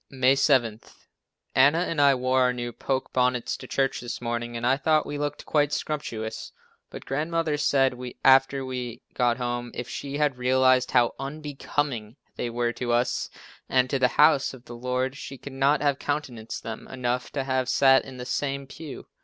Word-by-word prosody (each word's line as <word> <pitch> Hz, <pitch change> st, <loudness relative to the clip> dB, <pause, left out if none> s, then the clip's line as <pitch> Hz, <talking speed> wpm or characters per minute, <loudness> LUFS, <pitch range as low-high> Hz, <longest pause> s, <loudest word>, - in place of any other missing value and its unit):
May 130 Hz, 0 st, +3 dB
7. 130 Hz, -5 st, +2 dB, 0.7 s
Anna 140 Hz, +5 st, +5 dB
and 165 Hz, -4 st, 0 dB
I 140 Hz, -1 st, +6 dB
wore 130 Hz, +1 st, +1 dB
our 125 Hz, 0 st, +3 dB
new 120 Hz, -1 st, -4 dB
poke 130 Hz, +2 st, -3 dB
bonnets 125 Hz, -1 st, +1 dB
to -, -, -10 dB
church 135 Hz, -1 st, 0 dB
this 120 Hz, -1 st, -5 dB
morning 120 Hz, 0 st, -3 dB
and 125 Hz, +4 st, +1 dB
thought 155 Hz, +1 st, +3 dB
we 145 Hz, 0 st, -5 dB
looked 145 Hz, 0 st, -3 dB
quite 145 Hz, -1 st, +2 dB
"scrumptious," 110 Hz, -8 st, -4 dB, 0.4 s
but -, -, -10 dB
Grandmother 155 Hz, +2 st, -1 dB
said 135 Hz, -2 st, +2 dB, 0.3 s
after 135 Hz, 0 st, +5 dB
we 125 Hz, -2 st, -5 dB
got 120 Hz, -2 st, +1 dB
home, 120 Hz, -1 st, -3 dB
if 120 Hz, -, -5 dB
she 140 Hz, 0 st, -5 dB
had 145 Hz, -4 st, 0 dB
realized 130 Hz, 0 st, +3 dB
how 120 Hz, -2 st, +3 dB
unbecoming 140 Hz, -5 st, -3 dB, 0.2 s
they 120 Hz, -, -3 dB
were 120 Hz, 0 st, -1 dB
to 120 Hz, -1 st, -3 dB
us 120 Hz, +1 st, 0 dB, 0.4 s
and 130 Hz, 0 st, +2 dB
to 135 Hz, -, +1 dB
the 125 Hz, -, +5 dB
house 150 Hz, -3 st, +4 dB
of 125 Hz, -1 st, -17 dB
the 120 Hz, -, -9 dB
Lord, 125 Hz, +2 st, -2 dB
she 135 Hz, -1 st, -8 dB
could 140 Hz, +1 st, -10 dB
not 140 Hz, +3 st, +2 dB
have 140 Hz, -2 st, +1 dB
countenanced 130 Hz, -7 st, -4 dB
them 115 Hz, -1 st, -7 dB
enough 125 Hz, -1 st, -2 dB
to 140 Hz, -, -1 dB
have 130 Hz, -1 st, -1 dB
sat 135 Hz, -1 st, +5 dB
in 130 Hz, -1 st, -10 dB
the 125 Hz, -, -6 dB
same 140 Hz, +1 st, -2 dB
pew. 150 Hz, +1 st, -9 dB
130 Hz, 180 wpm, -26 LUFS, 120-140 Hz, 0.7 s, I